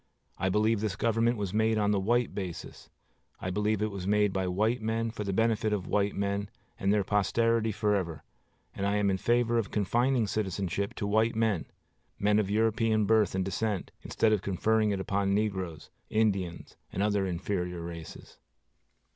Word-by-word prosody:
I 95 - +1
believe 105 +2 +2
this 105 -4 -1
government 115 +2 +1
was 100 -2 -3
made 110 +1 +2
on 105 -1 +2
the 100 - +2
white 120 +5 +1
basis. 95 -4 -7 0.5
I 90 - -3
believe 105 +2 0
it 110 - -1
was 95 -2 -5
made 105 -1 +3
by 95 -1 -1
white 110 +6 +1
men, 115 +1 -1
for 110 -2 -5
the 100 - -2
benefit 110 +1 +1
of 95 -4 -2
white 100 0 0
men 100 0 -1 0.3
and 95 - +1
their 105 -1 +3
posterity 110 +3 +1
forever; 100 -7 -1 0.5
and 100 - -2
I 100 - +1
am 105 -1 +2
in 95 - 0
favor 120 +1 +2
of 110 - -3
confining 120 +4 +1
citizenship 100 -1 -2
to - - -3
white 110 +3 +2
men, 110 -6 0 0.5
men 105 +1 +3
of 100 -2 0
European 110 0 +2
birth 110 -3 +3
and 95 -1 0
descent, 100 +1 -2
instead 110 -1 +1
of 105 - +1
conferring 110 +3 +1
it 100 -2 -1
upon 100 0 0
negroes, 95 -7 -2 0.2
Indians, 100 -6 -1
and 95 - -1
other 100 -2 +1
inferior 90 -1 -3
races. 85 -1 -9
105 Hz, 175 wpm, -29 LUFS, 95-110 Hz, 0.5 s, made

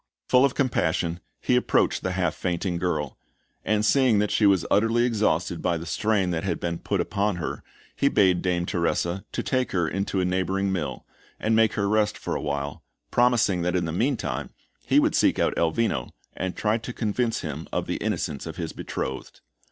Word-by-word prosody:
Full 125 0 +6
of 140 - +2
compassion, 85 - 0 0.2
he 125 - +1
approached 125 - +2
the 95 - -2
half 90 -3 0
fainting 90 0 -2
girl; 75 -6 -2 0.4
and, 105 0 +1
seeing 130 -2 +4
that 105 0 +1
she 105 - +4
was 95 -4 +3
utterly 115 +3 +3
exhausted 110 -3 0
by 85 - +1
the 80 - -7
strain 100 +1 +1
that 85 -1 -2
had 90 -4 -1
been 85 -1 -3
put - - -1
upon 100 -1 0
her, 85 - -4 0.3
he 140 - +2
bade 95 -7 +3
Dame 90 -2 0
Teresa 85 0 -1
to - - -3
take 130 -1 0
her 90 -3 +1
into 100 +2 -1
a 90 - +1
neighbouring 95 +2 0
mill, 75 -9 -3 0.3
and 110 +1 +1
make 110 -1 +4
her 105 -2 0
rest 105 0 +1
for - - -3
a - - -2
while, 70 -1 -3 0.3
promising 120 -7 +3
that 90 +1 0
in 90 -1 +1
the 80 - -3
meantime, 120 - -1 0.4
he - - +5
would - - +2
seek - - +3
out - - +1
Elvino 85 - 0 0.3
and 95 -1 -3
try 110 +2 +1
to 120 +2 -7
convince 115 +1 -1
him - - -5
of - - -1
the - - -2
innocence 70 -3 -3
of - - -6
his - - -4
betrothed. 65 - -5
95 Hz, 195 wpm, -25 LUFS, 85-110 Hz, 0.4 s, Full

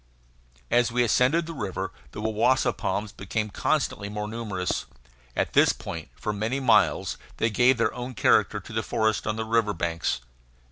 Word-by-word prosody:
As 120 -1 +3
we 120 +1 +2
ascended 130 +8 +3
the 165 - -6
river 95 - -4 0.2
the 105 - -7
wawasa 110 +4 +2
palms 100 +2 -2
became 105 +3 -3
constantly 120 -6 0
more 105 0 -4
numerous. 105 -5 -3 0.5
At - - -1
this - - +5
point, - - -7
for 105 - -3
many 110 +6 -1
miles, 125 -4 +3 0.2
they 115 - +1
gave 120 +4 +4
their 115 -2 +1
own 125 0 -6
character - - +3
to - - -11
the - - 0
forest 110 -2 0
on 105 - 0
the 110 0 -3
river 110 -2 +1
banks. 85 -6 -1
110 Hz, 170 wpm, -26 LUFS, 105-120 Hz, 0.5 s, this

